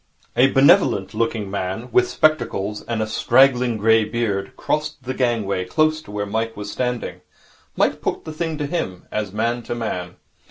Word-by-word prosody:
A 130 - +6
benevolent 120 -7 +4
looking 110 -2 -1
man, 100 +5 -3
with 125 +1 +3
spectacles 115 -9 +1
and 115 -2 -1
a - - -3
straggling 125 +1 +3
grey 110 +1 +4
beard, 105 -3 -2
crossed 150 -2 -2
the 130 +1 -3
gangway 115 -8 0
close 155 +11 +1
to - - -17
where 105 0 -3
Mike 110 +2 -2
was 105 0 -5
standing. 125 0 -3 0.6
Mike - - +1
put - - -3
the 155 - -6
thing 160 0 -3
to 145 - -2
him, 140 - -3
as 105 -3 -2
man 115 +3 -1
to 120 - -5
man. 90 -6 -4
115 Hz, 170 wpm, -21 LUFS, 105-130 Hz, 0.6 s, A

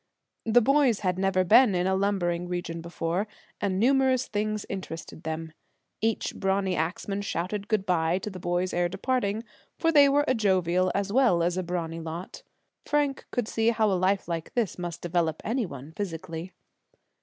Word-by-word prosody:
The 235 +2 +6
boys 270 -3 +3
had 185 -2 0
never 190 -1 +2
been 215 +2 +6
in 180 0 +1
a 190 - +2
lumbering 185 -3 0
region 175 -2 -4
before, 170 +4 -2 0.3
and 190 -2 0
numerous 260 +1 +3
things 215 0 -2
interested 165 -4 -6
them. 160 0 -5 0.5
Each 225 0 0
brawny 190 -1 0
axman 180 +5 -2
shouted 200 +1 -3
good 215 -3 0
by 170 -1 +2
to 210 +2 -5
the 185 - -8
boys 175 +1 -1
ere 175 0 +1
departing, 215 +2 -1 0.3
for 330 - +2
they 285 -3 +7
were 290 +1 +3
a - - +3
jovial 185 -5 +2
as 200 0 -1
well 235 -10 +4
as 175 +1 +1
a 185 - 0
brawny 170 -2 -3
lot. 165 +3 -7 0.4
Frank 290 -2 0
could 245 -4 -2
see 225 0 +1
how 220 -2 +2
a - - +2
life 190 +2 +1
like 165 -2 -4
this 225 -7 0
must 175 -2 -5
develop 170 -2 0
any 230 -1 0
one 140 0 -9
physically. 165 -2 -5
190 Hz, 175 wpm, -27 LUFS, 175-220 Hz, 0.5 s, they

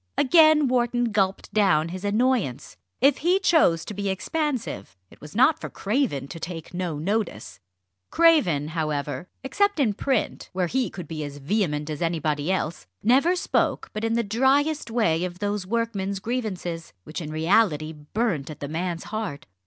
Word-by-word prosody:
Again 310 0 +6
Wharton 240 -1 +1
gulped 195 -2 0
down 175 -7 +3
his 185 +2 -7
annoyance. 205 - 0 0.3
If 275 +1 +5
he 355 +4 +3
chose 300 - +3
to - - -6
be 200 0 -2
expansive, 250 - -3
it - - -18
was 150 +4 -11
not 290 +7 +4
for - - -5
Craven 200 - -1
to 165 - -7
take 165 0 -7
no 175 -4 -3
notice. 185 - -3 0.5
Craven, 215 - +3
however, 155 +1 -3
except 405 +7 +1
in 235 -7 +2
print, 255 +3 -1
where 185 -1 0
he 255 +7 0
could 180 -4 -8
be 155 -1 -5
as 145 -1 -7
vehement 150 -1 -1
as 150 - -5
anybody 155 -1 0
else, 170 - -2 0.2
never 275 +10 +4
spoke 360 - 0
but 215 - -4
in 225 0 +1
the 235 0 +1
driest 270 +7 +1
way 180 -8 +1
of 180 -1 -4
those 205 -1 -2
workman's 205 -3 -1
grievances, 190 -8 -4
which 155 +3 -6
in 155 - -6
reality 160 -1 +2
burnt 155 - -2
at 155 - -8
the 145 - -4
man's 170 +2 -3
heart. 215 -9 -5
195 Hz, 165 wpm, -25 LUFS, 160-245 Hz, 0.5 s, Again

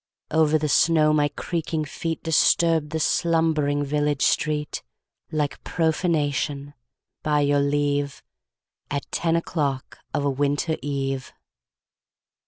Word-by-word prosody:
Over 155 0 +3
the 155 0 -1
snow 155 0 +4
my 150 -1 +3
creaking 160 0 -3
feet 160 +3 -4
Disturbed 165 -1 +3
the 160 +1 -2
slumbering 155 -3 +1
village 145 0 0
street 150 -1 0 0.5
Like 150 -2 -2
profanation, 150 -4 -1 0.5
by 150 -1 +1
your 145 0 +3
leave, 145 0 0 0.7
At 140 -1 -3
ten 165 -1 +1
o'clock 145 -5 -2
of 145 - -1
a - - +2
winter 145 +4 0
eve. 135 -2 -3
150 Hz, 110 wpm, -24 LUFS, 145-160 Hz, 0.7 s, snow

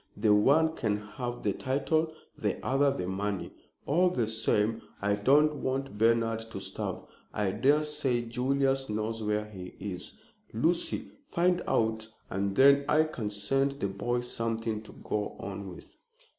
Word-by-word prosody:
The 105 0 +4
one 155 +10 +4
can 105 -4 0
have 120 +4 -6
the 100 - +1
title, 155 +6 0 0.2
the - - -1
other 140 +2 +3
the 110 -10 -2
money. 100 0 -2 0.3
All 180 +5 +3
the 125 -10 0
same 110 0 +1 0.2
I 100 0 +1
don't 145 +8 +4
want 135 -2 -2
Bernard 115 0 +3
to - - -6
starve. - - -4 0.3
I 105 -2 +1
daresay 145 +1 +2
Julius 135 +3 0
knows 110 +1 -2
where 105 0 0
he 95 -4 -9
is, 95 -2 -5 0.4
Lucy. 160 +10 0 0.2
Find 175 0 +2
out, 110 -1 +1 0.2
and 100 +1 -1
then 140 +1 +6
I 155 +1 +5
can 125 -9 -4
send 135 +7 0
the 100 -8 -3
boy 120 +5 -1
something 115 -2 -2
to 110 - -13
go 105 -1 -2
on 100 0 -6
with." 90 - -12
115 Hz, 150 wpm, -29 LUFS, 105-140 Hz, 0.4 s, then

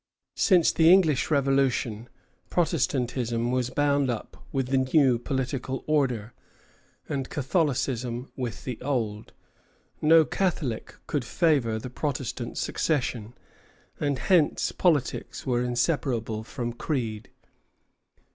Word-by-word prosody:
Since 180 -5 +4
the 160 +1 +5
English 165 -8 +4
Revolution, 135 -5 +1 0.4
Protestantism 125 -7 0
was 125 -1 0
bound 140 -1 +1
up 120 -3 -6
with 135 -2 -1
the 135 0 +3
new 130 -2 +3
political 130 0 -3
order, 125 -7 0 0.7
and 135 -2 -3
Catholicism 130 -4 -1
with 125 -3 -5
the 125 -3 -5
old. 115 -7 -2 0.7
No 160 +1 +6
Catholic 155 - -2
could 145 -4 -1
favor 130 -4 +1
the 120 +3 -7
Protestant 130 -4 -3
succession, 125 -7 -1 0.6
and 145 -2 0
hence 170 0 +2
politics 150 -8 0
were 125 -2 +1
inseparable 120 -4 -1
from 120 0 -4
creed. 115 -4 -3
130 Hz, 105 wpm, -26 LUFS, 120-145 Hz, 0.7 s, No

